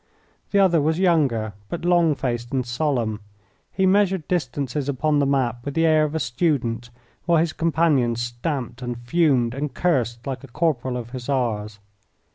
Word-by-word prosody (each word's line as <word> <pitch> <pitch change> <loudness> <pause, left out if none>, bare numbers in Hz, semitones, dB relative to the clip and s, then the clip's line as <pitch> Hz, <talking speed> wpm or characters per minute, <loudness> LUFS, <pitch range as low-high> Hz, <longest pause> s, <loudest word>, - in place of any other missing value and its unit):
The 200 - +1
other 180 -5 +4
was 160 +2 +1
younger, 140 - +2 0.2
but 170 0 -5
long 170 -3 +4
faced 120 -3 -3
and 130 -2 0
solemn. 120 -4 -1 0.5
He 190 - +1
measured 190 -4 +2
distances 145 -4 -2
upon 145 +2 +1
the 140 - +2
map 120 -4 0
with 140 +1 -5
the 165 0 +3
air 155 -1 +4
of 150 +1 -4
a - - +1
student, 120 -3 -1 0.4
while 170 -1 +4
his 160 0 +1
companion 155 -7 +2
stamped 120 +1 -4
and 120 -1 -4
fumed 125 -2 +2
and 140 +2 -4
cursed 120 -9 0
like 135 0 -4
a - - -9
corporal 130 -3 -1
of 120 -1 -7
Hussars. 120 -5 -2
140 Hz, 165 wpm, -23 LUFS, 120-160 Hz, 0.5 s, other